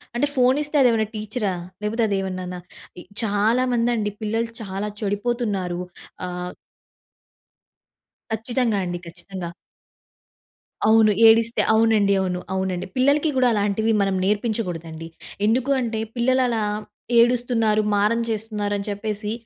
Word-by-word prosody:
అంటే 275 Hz, +5 st, +2 dB
ఫోన్ 255 Hz, +1 st, +4 dB
ఇస్తే 295 Hz, +1 st, -4 dB
అదేమన్నా 225 Hz, -4 st, +3 dB
టీచరా? 215 Hz, -1 st, -2 dB, 0.3 s
లేకపోతే 225 Hz, +3 st, 0 dB
అదేమన్నానా? 185 Hz, -2 st, -3 dB, 0.4 s
ఇ -, -, -10 dB, 0.2 s
చాలామందండి 230 Hz, +1 st, +1 dB
పిల్లలు 225 Hz, +2 st, -1 dB
చాలా 195 Hz, 0 st, -4 dB
చెడిపోతున్నారు. 205 Hz, -4 st, -1 dB, 0.5 s
ఆహ్ 180 Hz, 0 st, -5 dB, 1.8 s
ఖచ్చితంగా 230 Hz, -1 st, 0 dB
అండి. 175 Hz, 0 st, -4 dB
ఖచ్చితంగా. 180 Hz, +1 st, -7 dB, 1.4 s
అవును. 220 Hz, -1 st, +6 dB, 0.2 s
ఏడిస్తే 230 Hz, +1 st, +4 dB
అవునండి 220 Hz, -3 st, +4 dB
అవును. 180 Hz, -1 st, -1 dB
అవునండి. 190 Hz, -1 st, -2 dB
పిల్లలకి 285 Hz, +4 st, +3 dB
గుడా 255 Hz, -, +4 dB
అలాంటివి 210 Hz, +2 st, +1 dB
మనం 195 Hz, -1 st, +1 dB
నేర్పించకూడదండి. 180 Hz, -7 st, -2 dB, 0.4 s
ఎందుకుంటే, 240 Hz, 0 st, +1 dB, 0.2 s
పిల్లలు 255 Hz, +2 st, +2 dB
అలా 230 Hz, -3 st, 0 dB, 0.6 s
ఏడుస్తున్నారు, 235 Hz, -3 st, +3 dB
మారం 210 Hz, +3 st, +2 dB
చేస్తున్నారు, 215 Hz, -2 st, -2 dB
అని 200 Hz, +1 st, -5 dB
చెప్పేసి 210 Hz, +1 st, -3 dB
215 Hz, 105 wpm, -23 LUFS, 200-235 Hz, 1.8 s, అవును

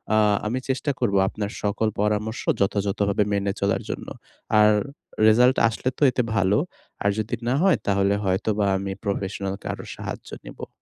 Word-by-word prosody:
আ -, -, +4 dB, 0.3 s
আমি 120 Hz, +4 st, -1 dB
চেষ্টা 140 Hz, +2 st, 0 dB
করবো 100 Hz, -6 st, +1 dB
আপনার 105 Hz, 0 st, -4 dB
সকল 105 Hz, +2 st, 0 dB
পরামর্শ 105 Hz, +2 st, -1 dB, 0.2 s
যথাযথভাবে 100 Hz, +1 st, +1 dB
মেনে 100 Hz, 0 st, 0 dB
চলার 100 Hz, 0 st, +1 dB
জন্য। -, -, -5 dB, 0.5 s
আর 105 Hz, 0 st, +6 dB, 0.6 s
রেজাল্ট 125 Hz, +4 st, +5 dB
আসলে 115 Hz, +3 st, -2 dB
তো -, -, -18 dB
এতে 125 Hz, -, 0 dB
ভালো। 100 Hz, 0 st, +3 dB, 0.5 s
আর 100 Hz, -, +3 dB
যদি 110 Hz, 0 st, -2 dB
না 125 Hz, -, +2 dB
হয় 190 Hz, -4 st, +4 dB
তাহলে 100 Hz, 0 st, +2 dB
হয়তোবা 100 Hz, +2 st, +1 dB
আমি 95 Hz, 0 st, -4 dB
প্রফেশনালকে 100 Hz, -1 st, -3 dB
আরও -, -, -8 dB
সাহায্য -, -, -7 dB, 0.2 s
নিবো। -, -, -8 dB
105 Hz, 155 wpm, -24 LUFS, 100-110 Hz, 0.6 s, আর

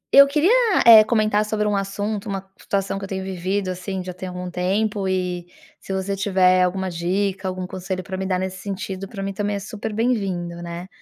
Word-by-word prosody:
Eu 280 Hz, 0 st, +10 dB
queria, 300 Hz, +7 st, +3 dB, 0.3 s
eh, 225 Hz, -2 st, +10 dB
comentar 215 Hz, -1 st, +2 dB
sobre 210 Hz, 0 st, -1 dB
um 210 Hz, -, +1 dB
assunto, 205 Hz, +1 st, -3 dB
uma 195 Hz, -1 st, -4 dB
situação 195 Hz, 0 st, -2 dB
que -, -, -9 dB
eu -, -, -11 dB
tenho 190 Hz, -1 st, -3 dB
vivido, 190 Hz, +1 st, -2 dB
assim, 185 Hz, +1 st, -4 dB
já 180 Hz, 0 st, -6 dB
tem 185 Hz, +1 st, -7 dB
algum 180 Hz, 0 st, -6 dB
tempo 195 Hz, +3 st, 0 dB
e 180 Hz, -2 st, -2 dB, 0.3 s
se -, -, -9 dB
você 190 Hz, +1 st, -1 dB
tiver 185 Hz, -2 st, +3 dB
alguma 190 Hz, +1 st, 0 dB
dica, 190 Hz, +3 st, -1 dB
algum 185 Hz, 0 st, -3 dB
conselho 185 Hz, 0 st, -4 dB
pra 190 Hz, -, -5 dB
me 190 Hz, -, -3 dB
dar 185 Hz, -1 st, +1 dB
nesse 185 Hz, 0 st, -3 dB
sentido, 195 Hz, 0 st, -5 dB
pra 195 Hz, -1 st, -6 dB
mim 195 Hz, 0 st, -3 dB
também 205 Hz, +1 st, -1 dB
é -, -, -2 dB
super 205 Hz, +2 st, -6 dB
bem-vindo, 195 Hz, -7 st, -1 dB
né. 170 Hz, +1 st, -6 dB
190 Hz, 205 wpm, -22 LUFS, 185-205 Hz, 0.3 s, Eu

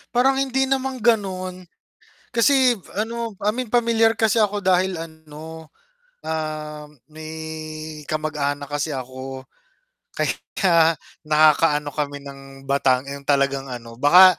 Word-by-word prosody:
Parang 265 Hz, +2 st, +4 dB
hindi 265 Hz, 0 st, +1 dB
namang 265 Hz, -3 st, -1 dB
ganon, 185 Hz, -5 st, 0 dB, 0.7 s
kasi 255 Hz, +1 st, +5 dB, 0.2 s
ano 230 Hz, -1 st, -3 dB
I 205 Hz, -, +2 dB
mean 250 Hz, -2 st, -4 dB
pamilyar 230 Hz, -2 st, +3 dB
kasi 220 Hz, 0 st, +3 dB
ako 210 Hz, 0 st, +1 dB
dahil 185 Hz, -2 st, +2 dB
ano, 160 Hz, 0 st, -10 dB, 0.6 s
ah, 155 Hz, -1 st, -4 dB, 0.2 s
may 155 Hz, +1 st, -9 dB, 0.8 s
kamag-anak 145 Hz, -2 st, -2 dB
kasi 145 Hz, +2 st, -1 dB
ako. 130 Hz, 0 st, -6 dB, 0.7 s
Ka -, -, -1 dB, 0.4 s
ya 165 Hz, -3 st, +5 dB, 0.3 s
nakakaano 150 Hz, -1 st, +4 dB
kami 145 Hz, 0 st, -4 dB
ng 140 Hz, -1 st, -10 dB, 0.3 s
batang 130 Hz, -2 st, +3 dB
yung 140 Hz, 0 st, -8 dB
talagang 140 Hz, -1 st, +1 dB
ano, 115 Hz, -2 st, -8 dB
baka 180 Hz, +6 st, +8 dB
160 Hz, 115 wpm, -22 LUFS, 145-210 Hz, 0.8 s, baka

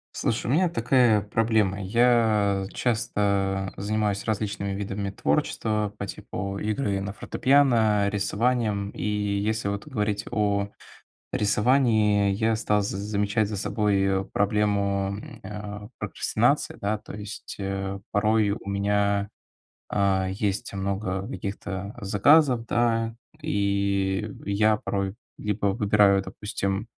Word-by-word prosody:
Слушай, 115 Hz, -, -1 dB
у -, -, -2 dB
меня 175 Hz, +3 st, +3 dB
такая 120 Hz, -5 st, +3 dB
проблема: 105 Hz, -1 st, +1 dB
я 105 Hz, -2 st, +2 dB
часто 100 Hz, -5 st, 0 dB
занимаюсь 105 Hz, 0 st, -1 dB
различными 105 Hz, -2 st, -2 dB
видами 100 Hz, 0 st, -3 dB
творчества 105 Hz, +1 st, 0 dB
по 100 Hz, -, -4 dB
типу 100 Hz, -1 st, -5 dB
игры 105 Hz, -2 st, -1 dB
на 100 Hz, +1 st, -4 dB
фортепиано, 115 Hz, -6 st, +3 dB
рисованием. 105 Hz, 0 st, 0 dB
И -, -, -8 dB
если 105 Hz, +1 st, -1 dB
вот 100 Hz, +5 st, -4 dB
говорить 105 Hz, -6 st, -2 dB
о 100 Hz, -3 st, 0 dB, 0.6 s
рисовании, 105 Hz, -2 st, +3 dB
я 110 Hz, +3 st, +1 dB
стал 105 Hz, -1 st, +1 dB
з 100 Hz, -, -2 dB
замечать 105 Hz, +1 st, 0 dB
за 105 Hz, 0 st, -4 dB
собой 95 Hz, -2 st, +1 dB
проблему, 100 Hz, -1 st, +1 dB
м, -, -, -11 dB
э, 105 Hz, +1 st, -7 dB
прокрастинации, -, -, 0 dB
да. 105 Hz, +2 st, 0 dB
То -, -, -12 dB
есть, 105 Hz, +1 st, -7 dB
э, 95 Hz, 0 st, -3 dB
порой 105 Hz, 0 st, +2 dB
у -, -, -14 dB
меня, 100 Hz, 0 st, +1 dB, 0.6 s
а, 95 Hz, -2 st, +1 dB
есть 100 Hz, +1 st, -2 dB
много 95 Hz, 0 st, -2 dB
каких-то 100 Hz, +1 st, -5 dB
заказов, 120 Hz, +5 st, +4 dB
да. 115 Hz, -1 st, +1 dB, 0.3 s
И 100 Hz, -5 st, 0 dB, 0.2 s
я 105 Hz, +2 st, +3 dB
порой 100 Hz, -1 st, -3 dB, 0.2 s
либо 105 Hz, 0 st, -2 dB
выбираю, 100 Hz, -1 st, +4 dB
допустим, 100 Hz, 0 st, -3 dB
105 Hz, 115 wpm, -26 LUFS, 100-110 Hz, 0.6 s, заказов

